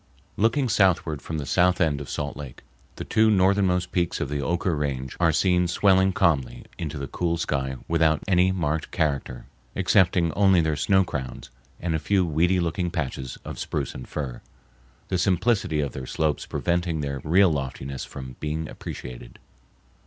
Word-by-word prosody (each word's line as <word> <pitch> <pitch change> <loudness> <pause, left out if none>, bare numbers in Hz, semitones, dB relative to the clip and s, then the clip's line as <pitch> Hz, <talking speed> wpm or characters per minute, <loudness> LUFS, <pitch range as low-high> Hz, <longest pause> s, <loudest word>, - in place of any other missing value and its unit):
Looking 120 +6 +2
southward 90 - +2
from 80 - -5
the 75 - -4
south 90 +4 +3
end 75 -4 +1
of 70 - -8
Salt 75 0 -3
Lake, 70 -4 -9 0.3
the - - -6
two 110 0 +3
northmost 95 -2 +2
peaks 85 -2 0
of - - -2
the 75 0 -2
Oquirrh 85 +3 0
Range 65 -3 -3
are 85 -2 +4
seen 90 +2 +2
swelling 95 +1 +3
calmly 85 -9 0
into 80 -2 -4
the 70 - -4
cool 85 +3 -1
sky 65 -4 -2
without 80 -2 +2
any 90 -1 +4
marked 80 -4 -1
character, 70 -5 -2 0.3
excepting 90 -2 +3
only 95 -3 +4
their 80 -2 +1
snow 95 +6 +3
crowns, 65 -8 -6 0.3
and 85 -2 -2
a 80 - 0
few 95 +4 +1
weedy 85 +4 +2
looking 85 +1 -1
patches 65 -5 -4
of - - -7
spruce - - -3
and 65 - -8
fir, 65 -5 -5 0.7
the 90 - 0
simplicity 95 -4 +1
of 70 -3 -2
their 65 -1 -7
slopes 80 -2 -1
preventing 85 -2 -1
their 70 -2 -3
real 90 +3 +4
loftiness 70 -2 -4
from 65 -2 -9
being 80 +1 -3
appreciated. - - -8
80 Hz, 165 wpm, -25 LUFS, 70-90 Hz, 0.7 s, are